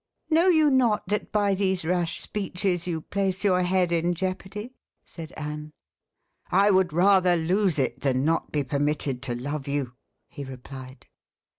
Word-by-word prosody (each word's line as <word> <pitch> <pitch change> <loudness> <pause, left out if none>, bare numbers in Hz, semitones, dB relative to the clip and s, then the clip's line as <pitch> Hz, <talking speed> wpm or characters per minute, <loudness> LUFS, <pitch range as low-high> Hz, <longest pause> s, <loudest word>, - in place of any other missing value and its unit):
"Know 330 +4 +4
you 315 -5 +5
not 240 -7 +2
that 210 0 -2
by 205 -2 +2
these 190 -3 0
rash 175 -1 -1
speeches 185 -3 -2
you 165 -3 -2
place 195 +2 -2
your 185 -3 +3
head 180 -1 +1
in 170 +1 +1
jeopardy?" 190 +6 -4 0.3
said 165 -1 -9
Anne. 150 0 -6 0.8
"I 200 +3 +4
would 190 -3 +3
rather 185 +1 +4
lose 175 +1 +1
it 130 -2 -1
than 130 -1 +1
not 165 +1 0
be 145 -1 0
permitted 140 -1 -1
to 125 -2 -3
love 140 +3 -4
you," 140 -3 -2 0.3
he 140 - -8
replied. 130 0 -10
175 Hz, 155 wpm, -26 LUFS, 145-195 Hz, 0.8 s, you